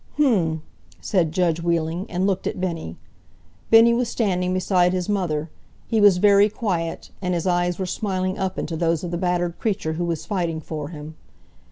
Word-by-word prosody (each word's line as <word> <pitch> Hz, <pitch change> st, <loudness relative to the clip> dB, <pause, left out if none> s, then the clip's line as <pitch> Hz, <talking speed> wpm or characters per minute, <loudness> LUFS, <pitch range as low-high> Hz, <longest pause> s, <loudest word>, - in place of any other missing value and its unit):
"H'm!" 180 Hz, -, +2 dB, 0.4 s
said 175 Hz, -6 st, 0 dB
judge 170 Hz, -1 st, +1 dB
Wheeling, 170 Hz, +2 st, -1 dB
and 180 Hz, +2 st, -1 dB
looked 190 Hz, -2 st, 0 dB
at -, -, -3 dB
Bennie. 165 Hz, -, -4 dB, 0.7 s
Bennie 225 Hz, +1 st, +7 dB
was 240 Hz, 0 st, 0 dB
standing 180 Hz, -6 st, 0 dB
beside 185 Hz, -1 st, +2 dB
his 180 Hz, -1 st, -2 dB
mother. 170 Hz, -7 st, -1 dB, 0.3 s
He 220 Hz, -2 st, +1 dB
was 205 Hz, -3 st, +6 dB
very 200 Hz, +2 st, +5 dB
quiet, 180 Hz, -7 st, -3 dB
and 180 Hz, -1 st, -1 dB
his 170 Hz, -, -2 dB
eyes 175 Hz, -1 st, +1 dB
were 190 Hz, -, -2 dB
smiling 185 Hz, -1 st, -2 dB
up 190 Hz, -1 st, -2 dB
into 165 Hz, -, -3 dB
those 165 Hz, 0 st, 0 dB
of 175 Hz, -, -4 dB
the 175 Hz, -, -1 dB
battered 175 Hz, -2 st, -1 dB
creature 190 Hz, -7 st, -1 dB
who 175 Hz, +2 st, -2 dB
was 165 Hz, -2 st, -3 dB
fighting 170 Hz, -5 st, -2 dB
for 155 Hz, -2 st, -6 dB
him. 155 Hz, -1 st, -9 dB
180 Hz, 180 wpm, -23 LUFS, 165-195 Hz, 0.7 s, Bennie